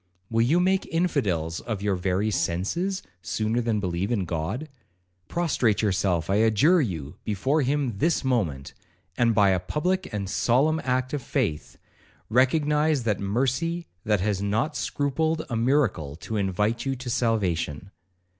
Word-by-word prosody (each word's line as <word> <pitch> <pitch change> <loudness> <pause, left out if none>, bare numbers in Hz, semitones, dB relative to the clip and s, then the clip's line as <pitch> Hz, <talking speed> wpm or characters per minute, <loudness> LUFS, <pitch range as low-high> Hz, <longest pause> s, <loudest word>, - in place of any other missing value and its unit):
Will 115 0 +2
you 145 +9 +3
make 190 +2 +2
infidels 100 - 0
of 110 -4 -5
your 105 -1 +1
very 95 +3 0
senses, 170 - -1 0.2
sooner 110 +4 -1
than 115 -2 0
believe 90 0 -2 0.2
God? 90 - -3 0.6
Prostrate 135 -11 +1
yourself, 95 -4 +1
I 100 - +2
adjure 115 - +4
you, 80 - -4
before 130 +9 0
him 135 -6 -1
this 165 -1 +2
moment, 95 - -1 0.4
and, 115 -2 +2
by 100 -2 +5
a 95 - +2
public 180 - -1
and 100 -2 -3
solemn 140 +10 +2
act 130 +1 -1
of 145 - -1
faith, 110 - -2 0.5
recognise 150 +3 +2
that 105 -4 0
mercy 135 - -1 0.2
that 105 -3 +1
has 100 -1 0
not 110 +9 0
scrupled 160 +3 -1
a - - 0
miracle 115 - +1
to 110 +7 -6
invite 105 +3 0
you 135 -1 -1
to 125 0 -9
salvation.' 100 - -1
115 Hz, 145 wpm, -26 LUFS, 95-145 Hz, 0.6 s, by